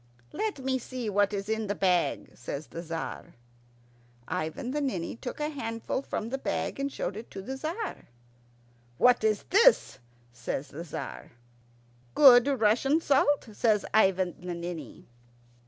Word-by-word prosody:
"Let 430 Hz, -4 st, -2 dB
me 260 Hz, -1 st, -1 dB
see 245 Hz, -3 st, -5 dB
what 205 Hz, 0 st, +3 dB
is 200 Hz, -1 st, -3 dB
in 220 Hz, 0 st, -1 dB
the 205 Hz, -, -1 dB
bag," 180 Hz, -3 st, +1 dB
says 140 Hz, +4 st, -6 dB
the 165 Hz, -, -7 dB
Tzar. 165 Hz, -1 st, -6 dB, 0.9 s
Ivan 160 Hz, +8 st, -3 dB
the 295 Hz, +2 st, -1 dB
Ninny 195 Hz, -12 st, -2 dB
took 245 Hz, +4 st, -7 dB
a 300 Hz, 0 st, -1 dB
handful 230 Hz, -3 st, -3 dB
from 225 Hz, -4 st, -4 dB
the 270 Hz, +2 st, -3 dB
bag -, -, -2 dB
and 280 Hz, 0 st, -1 dB
showed 190 Hz, -, -3 dB
it 220 Hz, +2 st, -8 dB
to -, -, -8 dB
the 265 Hz, +6 st, -5 dB
Tzar. 330 Hz, +10 st, -5 dB, 0.9 s
"What 245 Hz, -2 st, +5 dB
is 215 Hz, -1 st, +1 dB
it?" 460 Hz, -, +5 dB, 0.3 s
says 120 Hz, +4 st, -4 dB
the 160 Hz, +5 st, -7 dB
Tzar. 150 Hz, -, -7 dB, 0.8 s
"Good 255 Hz, -3 st, +8 dB
Russian 270 Hz, +3 st, +3 dB
salt," 285 Hz, -4 st, +2 dB
says 210 Hz, -1 st, +2 dB
Ivan 190 Hz, -4 st, +3 dB
the 180 Hz, -1 st, -5 dB
Ninny. 170 Hz, -5 st, -7 dB
220 Hz, 150 wpm, -28 LUFS, 180-270 Hz, 0.9 s, Good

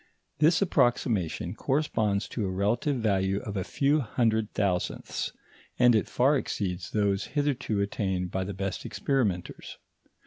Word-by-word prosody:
This 160 Hz, +5 st, +4 dB
approximation 120 Hz, -, +1 dB
corresponds 110 Hz, -8 st, 0 dB
to 115 Hz, -, -3 dB
a 95 Hz, -, -1 dB
relative 105 Hz, +9 st, 0 dB
value 100 Hz, -3 st, +1 dB
of 105 Hz, -, -6 dB
a 95 Hz, -, -1 dB
few 145 Hz, +8 st, +1 dB
hundred 110 Hz, -3 st, 0 dB
thousandths, 95 Hz, -4 st, -1 dB, 0.5 s
and 125 Hz, -1 st, +6 dB
it 110 Hz, -, +2 dB
far 135 Hz, +4 st, +3 dB
exceeds 90 Hz, -3 st, -3 dB
those 100 Hz, -2 st, +1 dB
hitherto 135 Hz, -7 st, 0 dB
attained 95 Hz, -3 st, -2 dB
by 95 Hz, -, -1 dB
the 100 Hz, -, -4 dB
best 95 Hz, 0 st, -3 dB
experimenters. 105 Hz, -4 st, -2 dB
105 Hz, 135 wpm, -28 LUFS, 95-125 Hz, 0.5 s, and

